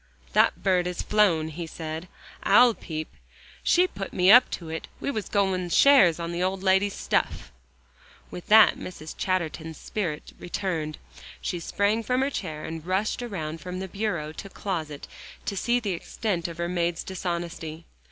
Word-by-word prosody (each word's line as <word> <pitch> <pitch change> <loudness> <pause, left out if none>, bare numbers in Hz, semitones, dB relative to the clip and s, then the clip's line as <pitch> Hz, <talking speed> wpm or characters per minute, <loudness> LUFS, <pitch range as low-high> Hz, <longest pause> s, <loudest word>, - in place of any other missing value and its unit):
"That - - +3
bird 180 -2 +2
has 180 -1 -3
flown," 175 -7 +3
he 165 +2 -6
said. 160 +1 -6 0.3
"I'll 245 -1 +6
peep. 155 -6 -6 0.5
She 355 +1 +4
put 195 - -6
me 185 +1 +5
up 245 +3 +8
to 165 -3 -6
it; 160 0 -5
we - - -2
was 215 -6 -4
goin' 190 -3 +1
shares 195 - +6
on 170 0 -3
the 170 +1 -3
old 190 +1 -1
lady's 190 +1 +3
stuff." - - -1 0.8
With 175 - -8
that 220 +1 +7
Mrs. 160 -3 -8
Chatterton's 165 -4 -2
spirit 170 -8 -4
returned. 165 -4 -3 0.4
She 175 - -3
sprang 205 +6 0
from 250 +3 0
her 275 +1 +1
chair, 155 - -5
and 160 -1 -6
rushed 190 +7 -1
around 165 -9 -5
from 180 0 -5
bureau 190 -4 -3
to 195 +5 -9
closet 160 -8 -4 0.4
to 200 - -2
see 240 +5 +1
the 210 -4 -2
extent 175 0 -2
of 170 -1 -8
her 170 0 -1
maid's 175 -1 -1
dishonesty. 170 -3 -5
180 Hz, 160 wpm, -26 LUFS, 165-200 Hz, 0.8 s, up